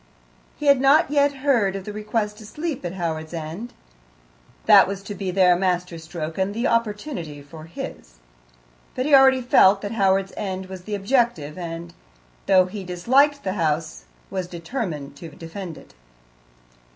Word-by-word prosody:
He 295 - -6
had 280 -2 +5
not 280 +2 +4
yet 285 -1 +3
heard 220 -9 +2
of 195 - -5
the 210 - -6
request 210 0 -3
to 215 - -11
sleep 300 - -4
at 175 0 -4
Howards 160 -2 -4
End; 165 +9 -6 0.9
that - - +7
was 195 0 -5
to 205 - -6
be 195 -1 -4
their 180 -1 +4
master 180 -2 -1
stroke 160 +1 -6
and 195 +2 -1
the 235 +3 -1
opportunity 210 - -2
for 155 +2 -12
his. - - -8 0.8
But 255 - -1
he 295 - 0
already 265 -1 +6
felt 195 -4 +5
that 205 - -4
Howards 195 -3 +1
End 190 -2 -4
was 185 -1 -10
the 210 - -3
objective, 200 - 0
and, 170 -1 -7 0.5
though 185 -1 +5
he 195 +2 -7
disliked 260 +12 +2
the 190 - -2
house, 155 -3 -2 0.3
was 185 -2 -3
determined 165 - -5
to 165 +2 -9
defend 165 +2 -8
it. - - -16
190 Hz, 165 wpm, -23 LUFS, 170-230 Hz, 0.9 s, that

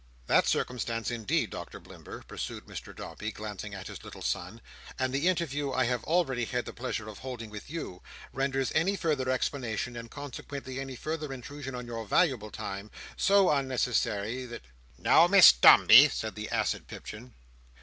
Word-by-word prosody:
"That - - +3
circumstance, 115 -2 -1
indeed, 115 -4 -1
Doctor - - -7
Blimber," - - -11
pursued - - -6
Mr - - -9
Dombey, 105 +1 -6
glancing 105 -1 -7
at 95 - -8
his - - -9
little - - -10
son, - - -3 0.4
"and 130 0 -1
the 140 +6 +1
interview 145 -6 0
I 130 0 +2
have 125 -1 -1
already 145 -8 +1
had 125 +1 -2
the - - -7
pleasure 120 -3 -4
of 105 -2 -9
holding 120 -4 -7
with 105 +3 -9
you, 150 - -6 0.3
renders 135 0 -1
any 185 +5 +2
further 150 -8 -1
explanation, 125 -2 -2
and 115 0 -7
consequently, 140 -1 -7
any 135 -1 -6
further 155 +2 -4
intrusion 135 +1 -7
on 125 0 -6
your 115 -1 -5
valuable 125 - +2
time, 100 +1 -6 0.3
so 195 -2 +4
unnecessary, 125 -3 0
that—" 120 0 -9 0.3
"Now, - - +5
Miss - - +9
Dombey!" 120 - +8
said 110 -4 -4
the 105 0 -6
acid - - -1
Pipchin. 115 +2 -10
125 Hz, 165 wpm, -29 LUFS, 110-140 Hz, 0.4 s, Miss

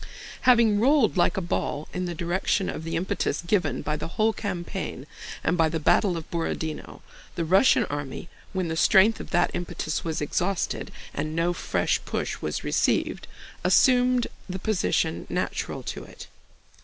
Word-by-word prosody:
Having 230 -4 +5
rolled 260 -1 +4
like 185 +3 +2
a - - +1
ball 155 -3 -2
in 180 0 -2
the 175 -1 -4
direction 180 +3 0
of - - -6
the 165 0 -3
impetus 175 0 -1
given 170 - 0
by 150 - -1
the 150 - -4
whole 215 +6 +1
campaign 180 - -4 0.4
and - - +2
by 165 -2 +3
the 160 +1 -2
battle 180 +3 +3
of 160 - -7
Borodinó, 165 -2 -4 0.3
the 170 - -1
Russian 190 +10 +5
army—when 145 +6 -5
the 160 - -2
strength 200 +5 +5
of - - -8
that 175 - +2
impetus 165 -2 -3
was 160 -2 -2
exhausted 180 +5 -1 0.2
and 155 0 -3
no 170 +1 +1
fresh - - 0
push - - -3
was - - -3
received—assumed 250 -2 +2 0.2
the 185 - -3
position 180 -5 0
natural - - -3
to - - -5
it. - - -11
175 Hz, 155 wpm, -26 LUFS, 160-205 Hz, 0.4 s, Having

